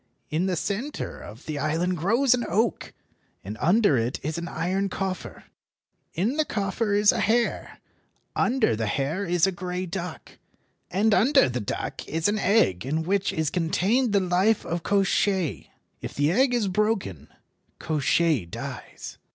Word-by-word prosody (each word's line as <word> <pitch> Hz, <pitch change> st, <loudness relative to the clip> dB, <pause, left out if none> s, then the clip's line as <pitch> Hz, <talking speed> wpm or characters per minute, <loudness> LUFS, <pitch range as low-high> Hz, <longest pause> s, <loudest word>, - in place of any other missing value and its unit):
In 165 Hz, +5 st, 0 dB
the 185 Hz, -, 0 dB
centre 210 Hz, -, -4 dB
of 110 Hz, +6 st, -11 dB
the 150 Hz, -2 st, -4 dB
island 165 Hz, +5 st, 0 dB
grows 230 Hz, -, +3 dB
an 245 Hz, -1 st, 0 dB
oak, 220 Hz, +7 st, 0 dB, 0.5 s
and 105 Hz, +3 st, -6 dB
under 175 Hz, -, +4 dB
it 115 Hz, +3 st, -2 dB
is 155 Hz, +3 st, -2 dB
an 170 Hz, -, -5 dB
iron 190 Hz, +4 st, -1 dB
coffer. 190 Hz, -1 st, -5 dB, 0.7 s
In 220 Hz, -, 0 dB
the 310 Hz, -, +3 dB
coffer 205 Hz, -3 st, -1 dB
is 205 Hz, 0 st, +5 dB
a -, -, -2 dB
hare, 235 Hz, +2 st, 0 dB, 0.6 s
under 245 Hz, -, +2 dB
the 110 Hz, 0 st, -2 dB
hare 145 Hz, -, -1 dB
is 175 Hz, -1 st, +2 dB
a 195 Hz, -, +1 dB
grey 180 Hz, 0 st, -4 dB
duck, 175 Hz, -1 st, -7 dB, 0.5 s
and 210 Hz, +4 st, +2 dB
under 270 Hz, +8 st, +5 dB
the 125 Hz, -1 st, -3 dB
duck 105 Hz, -, -4 dB
is 160 Hz, +3 st, 0 dB
an 210 Hz, +1 st, 0 dB
egg 185 Hz, -, +2 dB
in 155 Hz, +5 st, -1 dB
which 195 Hz, +3 st, 0 dB
is 160 Hz, -2 st, -1 dB
contained 195 Hz, +8 st, +1 dB
the 200 Hz, -, +4 dB
life 190 Hz, +4 st, +2 dB
of 170 Hz, +1 st, -2 dB
Koshchei. 190 Hz, -1 st, +1 dB, 0.3 s
If -, -, -7 dB
the 145 Hz, +2 st, +2 dB
egg 250 Hz, +5 st, +3 dB
is 225 Hz, -4 st, +1 dB
broken, 190 Hz, -, -1 dB, 0.5 s
Koshchei 155 Hz, -, +1 dB
dies." -, -, -8 dB
185 Hz, 160 wpm, -25 LUFS, 160-210 Hz, 0.7 s, is